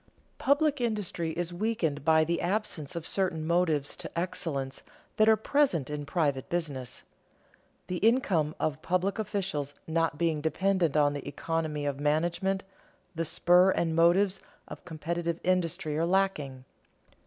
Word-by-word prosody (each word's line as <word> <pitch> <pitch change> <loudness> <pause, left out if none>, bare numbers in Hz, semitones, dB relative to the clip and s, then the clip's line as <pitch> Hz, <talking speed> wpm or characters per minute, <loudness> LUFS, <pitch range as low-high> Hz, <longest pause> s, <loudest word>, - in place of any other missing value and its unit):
Public 285 0 +2
industry 210 -7 -1
is 175 +1 -3
weakened 175 -8 -1
by 160 +1 +5
the 170 +2 -1
absence 180 -4 -2
of 170 -1 -4
certain 175 -5 0
motives 160 -4 +1
to - - -6
excellence 145 -7 -3 0.4
that 215 0 +5
are 220 - +7
present 215 - +1
in 145 -1 -4
private 145 -7 0
business. 145 -8 -4 0.8
The 180 - -3
income 190 - +2
of 155 0 -1
public 185 +4 0
officials 185 -9 -2
not 165 -2 0
being 160 -2 0
dependent 170 0 +1
on 145 -1 +4
the 145 -1 -6
economy 150 0 -2
of 140 -1 -2
management, 175 +6 0 0.5
the 165 0 -2
spur 175 +3 +4
and 165 -3 +1
motives 185 +4 +3 0.3
of - - -10
competitive 170 0 -3
industry 170 -4 0
are 165 - +2
lacking. 155 -9 0
170 Hz, 140 wpm, -29 LUFS, 150-190 Hz, 0.8 s, are